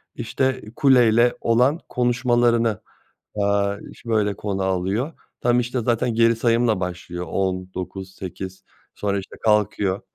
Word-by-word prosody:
işte, 130 +3 -1
kuleyle 120 -3 +4
olan 125 +7 +3
konuşmalarını, 120 -3 +2 0.5
eee, 100 -1 +1
ş 115 - -12
böyle 105 -2 +2
konu 100 -1 -3
alıyor. 95 - -1 0.3
Tam, 120 0 +3
işte, 125 +1 -1
zaten 115 0 0
geri 115 0 +4
sayımla 115 -2 +2
başlıyor 90 -1 -5
10-9-8 95 0 -4 0.3
sonra, 100 -1 -1
işte, 95 - -10
kalkıyor. 105 -2 +2
110 Hz, 110 wpm, -22 LUFS, 95-120 Hz, 0.5 s, kuleyle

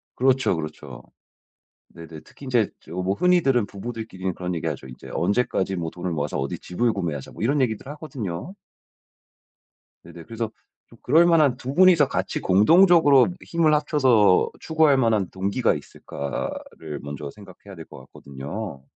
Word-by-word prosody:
그렇죠, 130 -4 +2
그렇죠. 75 -1 -7 0.9
네네. 80 -2 -11
특히 140 - -14
인제 120 -5 +1
저 - - -16
뭐 90 +2 -1
흔히들은 140 - +2
부부들끼리는 100 -3 -6
그런 90 +1 -4
얘기하죠. 75 -4 -4
이제 65 - -12
"언제까지 95 0 0
뭐 85 -2 -3
돈을 90 0 -5
모아서 75 -3 -2
어디 70 0 -3
집을 115 +7 -1
구매하자." 80 -9 -4
뭐 - - -11
이런 140 +4 +2
얘기들 110 -2 -2
하거든요. 145 - -6 1.5
네네. 85 0 -12
그래서 115 -1 -4 0.4
또 - - -18
그럴만한 160 -2 +4
두 130 +1 -6
분이서 175 -3 +5
같이 - - -2
공동적으로 145 - +5 0.2
힘을 165 -2 +1
합쳐서 130 -10 +3
추구할만한 130 - +2
동기가 100 +6 0
있을까를 75 +1 -6
먼저 70 0 -7
생각해야 100 +1 -14
될 80 -2 -10
것 - - -13
같거든요. 70 +3 -8
105 Hz, 350 characters per minute, -23 LUFS, 85-135 Hz, 1.5 s, 분이서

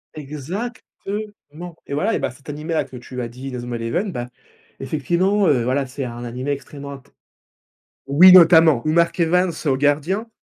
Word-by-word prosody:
Exactement 155 - -6 1.1
et 140 - -5
voilà 200 +10 0
et - - -1
bah, - - -2
cet 135 +3 -20
animé-là 155 +2 -2
que 130 - -13
tu 125 +1 -7
as 120 - -3
dit, 130 +3 -9
Inazuma 120 -1 -5
Eleven, 170 - -2
bah, 120 0 -4 0.5
effectivement, 175 +8 0
heu, 125 -5 +2
voilà, 135 +3 0
c'est 135 +1 -5
un 120 0 -7
animé 125 +4 -4
extrêmement 140 +1 -7
inté 135 -2 -14 1.0
oui, 175 +7 +7
notamment 165 -6 +7
ou - - +2
Mark 170 +1 +2
Evans 180 +1 +2
au 135 -2 +2
gardien. 155 - 0
145 Hz, 165 wpm, -20 LUFS, 130-170 Hz, 1.1 s, oui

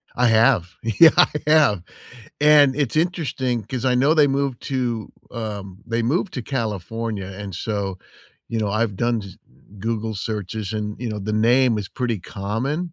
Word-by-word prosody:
I 125 0 +3
have. 110 -6 +3
Yeah, 115 +9 +7
I 175 - +7 0.2
have, 150 - +4 0.6
and 150 -3 +6
it's 140 -2 -1
interesting 140 -8 0
'cause 125 +3 -5
I 125 - +3
know 135 +5 +4
they 150 -2 +5
moved 135 -2 -1
to 120 -5 -2 0.2
um, 100 -5 -6
they 115 +1 -1
moved 170 - 0
to 125 - -3
California, 110 - -3
and 100 -1 -7
so, 100 -2 -3 0.5
you 115 - -2
know, 105 -2 0
I've 105 -1 -1
done 120 0 0
j 100 -1 -9 0.5
Google 110 0 -2
searches 105 -1 -4
and, 105 -1 -3
you 120 - -3
know, 105 -1 -4
the 105 +2 -4
name 120 +2 +3
is 100 - -5
pretty 120 -5 -2
common, 130 - -3
115 Hz, 165 wpm, -22 LUFS, 105-130 Hz, 0.6 s, Yeah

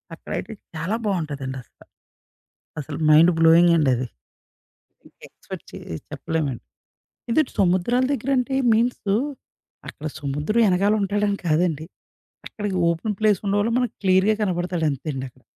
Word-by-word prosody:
అక్కడైతే 200 +5 -6 0.2
చాలా 165 +7 -2
బావుంటదండసల. 140 - -4 1.0
అసలు 145 0 -6
మైండ్ 160 +3 +7
బ్లోయింగండది. 165 -6 +4 1.0
ఇంకా - - -33
ఎక్స్‌పెక్ట్ - - -10
చే - - -7 0.3
చెప్పలేమండి. 150 -7 -3 0.7
ఇది 275 +7 +4 0.2
సముద్రాల 190 +7 +2
దగ్గర 275 0 -2
అంటే 250 +2 -1 0.2
మీన్సు, 220 -3 +1 0.7
అక్కడ 155 - -8
సముద్రం 150 +10 -1
ఏనకాలుంటాడని 205 +1 +1
కాదండి. 160 -1 +1 0.6
అక్కడికి 205 -3 -4
ఓపెన్ 190 +5 -2
ప్లేస్ 210 -3 +3
ఉండంవాళ్ళ 205 +3 +1
మనకు 245 -3 -1
క్లియర్‌గా 190 +3 +4
కనపడతాడంతేండక్కడ. 155 - -2
180 Hz, 100 wpm, -23 LUFS, 155-205 Hz, 1.0 s, మైండ్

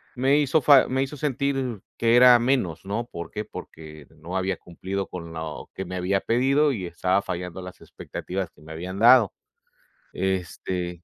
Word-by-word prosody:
me 135 +3 +3
hizo 150 +2 +2
fa 140 -1 +6
me 130 +1 0
hizo 140 +2 -6
sentir 135 -5 -2 0.2
que 115 0 +3
era 125 0 +8
menos, 120 - 0
¿no? 110 +4 -2
¿Por 85 -7 -8
qué? 105 - -4
Porque 75 -6 -11
no 85 +5 -5
había 95 -1 -1
cumplido 95 +4 -5
con 85 -2 -8
lo 80 -1 -6
que 95 - -4
me 90 - -6
había 95 +2 0
pedido 135 +5 +2
y 100 -8 -4
estaba 90 +3 0
fallando 90 -1 -5
las 90 0 -10
expectativas 95 -1 -6
que - - -23
me 80 +1 -12
habían 90 +4 -6
dado. 120 -2 +6 0.8
Este, 90 -1 -3
95 Hz, 175 wpm, -25 LUFS, 90-125 Hz, 0.8 s, era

